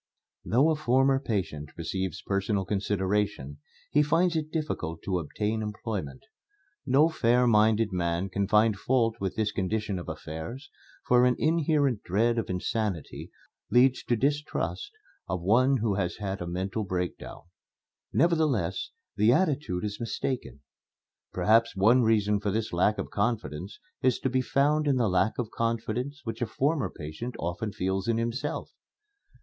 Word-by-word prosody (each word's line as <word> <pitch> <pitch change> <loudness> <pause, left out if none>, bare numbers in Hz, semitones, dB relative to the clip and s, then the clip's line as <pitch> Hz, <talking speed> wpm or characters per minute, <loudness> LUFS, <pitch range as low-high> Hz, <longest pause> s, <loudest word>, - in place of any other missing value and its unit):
Though 135 +8 +3
a - - +2
former 135 -1 +3
patient 90 - -4
receives 95 +1 -3
personal 100 0 -1
consideration, 100 -7 -1 0.3
he 150 - +4
finds 165 +3 +2
it 155 -1 -1
difficult 90 - -3
to 95 -2 -1
obtain 105 +7 -2
employment. 105 - -5 0.6
No 140 +4 +5
fair 125 -6 +2
minded 110 -1 +3
man 85 0 -1
can 100 +1 -1
find 105 +1 +4
fault 115 0 +1
with 95 -1 -3
this 110 -2 0
condition 105 0 -2
of 85 - -7
affairs, 80 - -7 0.3
for 125 0 +5
an 125 -1 +4
inherent 150 -7 +1
dread 115 +6 +1
of 115 - -4
insanity 95 -2 -3 0.4
leads 125 +1 +4
to 120 - +2
distrust 145 - -1 0.4
of 90 -2 -2
one 130 +8 +4
who 110 -3 0
has 90 -3 -1
had 100 -2 -4
a 90 - -4
mental 95 +5 -2
breakdown. 90 -2 -4 0.7
Nevertheless, 145 - +1 0.3
the 105 +3 +5
attitude 140 - +1
is 105 -1 -4
mistaken. 120 - -4 0.7
Perhaps 110 +5 +3
one 110 +7 +5
reason 105 -2 +2
for 105 0 -2
this 110 0 -2
lack 95 +5 +2
of - - -5
confidence 100 - -2 0.2
is 130 -2 +3
to 130 - 0
be 130 0 +2
found 145 +4 +2
in 140 - +3
the 120 -3 +2
lack 95 +3 +1
of 115 -3 -3
confidence 115 +5 -2
which 115 0 -5
a 120 - 0
former 140 +6 0
patient 80 +11 -7
often 85 +6 -3
feels 95 0 -2
in 115 -1 +1
himself. 120 +5 -3
110 Hz, 150 wpm, -28 LUFS, 95-130 Hz, 0.7 s, No